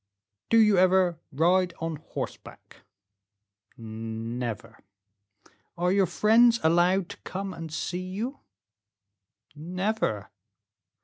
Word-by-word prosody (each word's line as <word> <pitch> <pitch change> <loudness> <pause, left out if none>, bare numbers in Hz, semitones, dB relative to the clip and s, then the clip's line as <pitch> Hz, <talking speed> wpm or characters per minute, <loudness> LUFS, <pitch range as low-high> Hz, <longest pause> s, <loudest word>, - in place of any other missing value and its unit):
"Do 230 - +4
you 210 -4 +5
ever 185 -2 +3
ride 175 +4 +2
on 165 -1 -3
horseback?" 155 - -8 1.0
"Never." 115 +1 -6 1.0
"Are 180 +1 +1
your 195 -1 +3
friends 230 +4 +4
allowed 175 +3 +3
to - - -9
come 195 0 -6
and 165 -1 -8
see 175 +3 -3
you?" 230 +9 -4 1.1
"Never." 175 - -2
180 Hz, 90 wpm, -27 LUFS, 155-195 Hz, 1.1 s, you